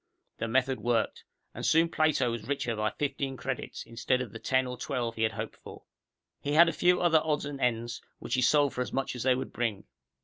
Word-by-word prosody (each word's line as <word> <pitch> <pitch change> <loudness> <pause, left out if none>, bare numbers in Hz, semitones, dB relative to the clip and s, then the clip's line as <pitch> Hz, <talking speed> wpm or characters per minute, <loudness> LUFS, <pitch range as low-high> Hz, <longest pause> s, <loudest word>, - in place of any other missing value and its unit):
The 115 - -1
method 130 +2 +1
worked. 120 -1 0 0.3
And - - -7
soon 165 +1 +4
Plato 155 -7 +2
was 115 -2 -5
richer 130 -5 -1
by 110 0 0
fifteen 135 +1 -3
credits, 130 -1 -4
instead 115 +2 0
of 125 -5 -4
the - - -8
ten 130 0 +1
or 125 0 -4
twelve 125 -3 -2
he 110 - -6
had 110 0 +2
hoped - - -5
for. - - -12 0.6
He 145 - -2
had 170 +3 +8
a 165 - +1
few 180 0 +3
other 165 -3 +4
odds 150 -2 0
and 140 -1 -6
ends, 120 -1 -1 0.2
which - - -6
he 125 - +2
sold 145 +3 +4
for 125 - -2
as 125 - -3
much 135 -1 -2
as 125 - -5
they 130 +1 +3
would 130 - -5
bring. 115 -4 -2
130 Hz, 230 wpm, -29 LUFS, 120-145 Hz, 0.6 s, had